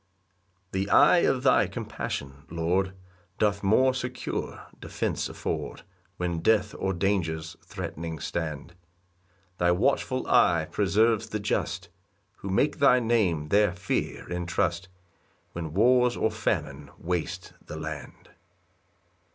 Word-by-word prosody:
3 95 +1 -1
The - - -8
eye - - +6
of 130 -6 +1
thy 130 - +4
compassion, 70 +1 -5
Lord, 90 +4 0 0.4
Doth 100 -1 +1
more 130 +7 +4
secure 125 -1 -4
defence - - -2
afford - - -4 0.3
When 85 -2 -2
death 110 +5 +2
or 95 - 0
dangers 85 -4 -1
threatening 80 0 -6
stand; 80 +1 -4 0.9
Thy 85 - +3
watchful 130 +6 +1
eye 85 -2 +4
preserves 110 +2 +2
the 110 - -2
just, 100 - -2 0.5
Who 100 - -7
make 100 +10 +1
thy 130 -3 +6
name 100 -11 +1
their 100 -1 +4
fear 95 +2 -3
and 90 -1 -3
trust, 85 0 0 0.6
When 85 -3 -5
wars 125 +3 +4
or 110 - +1
famine 75 -9 -2
waste 90 0 -3
the 75 - -8
land. 80 -3 -7
95 Hz, 120 wpm, -27 LUFS, 85-110 Hz, 0.9 s, eye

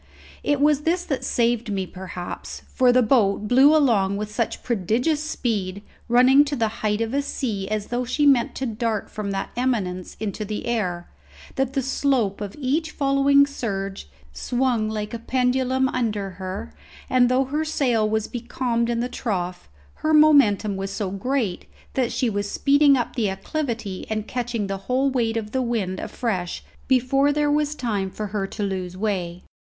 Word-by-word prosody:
It 290 -1 +1
was 295 0 +3
this 345 +3 0
that 275 - -2
saved 235 -1 0
me, 195 -2 -1
perhaps; 185 -1 -7
for 255 -2 +4
the 250 0 +4
boat 215 -4 +2
blew 270 +6 +6
along 200 -9 +2
with 210 0 -5
such 230 0 -2
prodigious 245 - 0
speed, 205 -10 -2 0.3
running 255 +4 +6
to 290 0 -2
the 225 -4 +1
height 210 0 0
of 230 +2 -2
a 280 - +2
sea 220 -8 -3
as 215 -1 -2
though 245 +1 -1
she 255 +4 0
meant 265 -5 +4
to 265 - -3
dart 225 -2 -2
from 210 -1 -4
that 195 0 -3
eminence 205 -8 -2
into 215 0 -3
the 210 0 -4
air, 185 -7 -2 0.5
that 265 -1 -1
the 270 -1 0
slope 255 -6 0
of 200 -1 -5
each 300 +4 0
following 280 -1 +4
surge 195 - -4 0.2
swung 240 - 0
like 215 +1 -4
a 235 - -4
pendulum 260 +2 +1
under 210 -6 -2
her, 185 - -6 0.3
and 250 -1 +4
though 260 +1 +2
her 295 +4 -1
sail 245 -8 +1
was 220 0 0
becalmed 240 -1 -2
in 235 0 0
the 245 - -1
trough, 180 - -4 0.3
her 310 0 +3
momentum 240 -10 +5
was 195 0 -3
so 195 -1 -3
great 215 -1 -2 0.3
that 255 -3 0
she 245 +1 0
was 205 -2 -2
speeding 285 +2 +4
up 240 - -3
the 225 -5 +1
acclivity 220 - -4
and 215 -1 -2
catching 240 -3 -2
the 195 0 -3
whole 265 +2 +2
weight 230 -3 0
of 210 -2 -4
the 260 - 0
wind 215 -7 -2
afresh 185 -7 -3 0.2
before 270 +2 +3
there 295 0 +1
was 300 0 +1
time 210 -8 -2
for 210 +3 -5
her 195 -2 -1
to 205 - -5
lose 185 -2 -3
way. 185 -4 -2
235 Hz, 175 wpm, -23 LUFS, 200-265 Hz, 0.5 s, blew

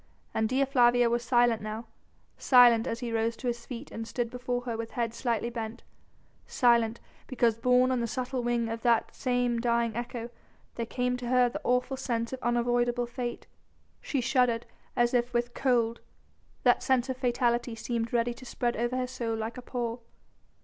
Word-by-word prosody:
And 220 0 0
Dea 265 +2 +2
Flavia 245 -3 +4
was 240 0 +1
silent 240 -2 +3
now: 215 +2 -5 0.5
silent 240 -3 +6
as 230 +1 -3
he 235 -2 -3
rose 225 0 0
to - - -9
his 235 -1 -3
feet 250 +2 -7
and 225 0 -6
stood 235 -1 -3
before 245 0 -2
her 240 -2 -4
with 225 0 -4
head 230 -2 -1
slightly 235 -1 -1
bent, 230 0 -6 0.6
silent, 235 -2 +3 0.3
because 235 -3 +1
borne 250 +1 +4
on 255 - +1
the 235 - -1
subtle 255 +2 -3
wing 240 -1 0
of 225 0 -4
that 235 -2 +2
same 245 -2 0
dying 235 -2 +1
echo 240 0 -5 0.4
there 230 -1 -4
came 250 +1 -1
to 245 -1 -6
her 250 0 +4
the - - -6
awful 250 +2 +1
sense 235 -2 -2
of 260 - -5
unavoidable 240 0 +1
fate. 240 0 -5 0.6
She 275 - -1
shuddered 240 -1 +2 0.3
as 240 0 +2
if 245 0 +1
with 240 0 0
cold, 235 -3 +1 0.6
that - - +4
sense 260 -2 +2
of 260 - -2
fatality 240 -2 0
seemed 230 0 -3
ready 240 0 +1
to 250 - -14
spread 240 -1 -2
over 240 +2 -1
her 255 - 0
soul 240 -3 -3
like 225 +1 -4
a - - -8
pall. 240 -1 -4
240 Hz, 185 wpm, -29 LUFS, 230-250 Hz, 0.6 s, silent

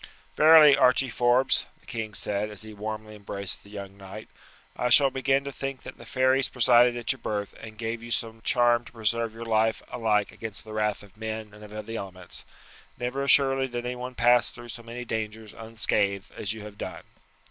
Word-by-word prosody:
"Verily, 155 -2 +8
Archie 130 -1 +3
Forbes," 120 +3 +2
the - - -28
king 110 -2 -4
said 105 +1 -1
as 105 0 -7
he 110 0 -10
warmly 110 +1 -6
embraced 100 -1 -4
the 100 - -17
young 100 -1 -8
knight, 100 +2 -10 0.5
"I 125 - 0
shall 135 +2 +6
begin 135 +1 +1
to 140 - -5
think 135 -1 -5
that - - -10
the 120 - -11
fairies 130 +2 +3
presided 120 0 +4
at 120 - -1
your 135 - -5
birth 105 -2 -3
and 110 -1 -10
gave 115 +1 -3
you 120 - -9
some 115 -1 -3
charm 120 0 +3
to - - -13
preserve 115 0 -1
your 115 +1 -7
life 110 0 +1
alike 105 -3 +1
against 110 -3 -7
the 110 - -10
wrath 105 -1 -1
of 100 0 -18
men 110 -1 -5
and 105 0 -13
of 105 0 -8
the 115 +1 -5
elements. 95 -2 -7 0.5
Never 125 +3 -3
assuredly 135 -1 +4
did 120 -1 -5
anyone 125 +1 -5
pass 120 0 +4
through 120 0 -12
so 120 +1 -7
many 120 +1 -7
dangers 110 -1 -4
unscathed 110 -3 -1
as 100 - -3
you 110 -1 -7
have 105 -1 -11
done." - - -6
115 Hz, 200 wpm, -27 LUFS, 105-125 Hz, 0.5 s, Verily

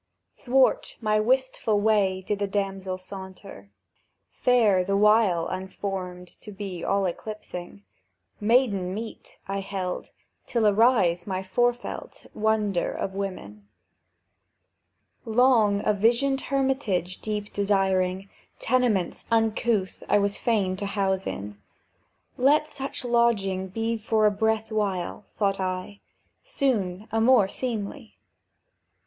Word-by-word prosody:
Thwart 265 +1 +1
my 215 -2 +1
wistful 245 -2 +1
way 205 -3 +2
did 205 -1 -2
a 200 - +1
damsel 195 -2 -2
saunter, 190 +1 -10 0.6
Fair, 220 -7 +3
the 195 +2 0
while 210 -5 +4
unformed 185 -1 -5
to 210 - -10
be 195 -3 -6
all 195 0 +1
eclipsing; 180 - -6 0.6
"Maiden 205 -5 +2
meet," 220 +1 -8
held 195 -2 -4
I, - - -26 0.4
"till 230 -3 +1
arise 205 -5 +3
my 190 -1 -2
forefelt 240 +6 -2
Wonder 210 -4 0
of 195 - -4
women." 105 - -6 1.6
Long 225 -3 +3
a 210 - +3
visioned 240 +6 +2
hermitage 265 -10 -1
deep 210 -1 -4
desiring, 195 -2 +1 0.3
Tenements 235 -7 0
uncouth 225 -3 +1
I - - +5
was 200 0 +1
fain 200 -6 0
to 200 0 -3
house 195 -1 -1
in; 100 +1 -6 0.8
"Let 290 +4 +4
such 275 -3 -4
lodging 215 -6 +1
be 225 +4 -2
for 215 0 +1
a 210 - +5
breath 220 +1 0
while," 200 -3 -2
thought 195 -2 +1
I, 185 +2 -3 0.4
"Soon 220 - -1
a 225 - +1
more 230 -4 +5
seemly. 230 +2 -5
205 Hz, 115 wpm, -26 LUFS, 190-225 Hz, 1.6 s, I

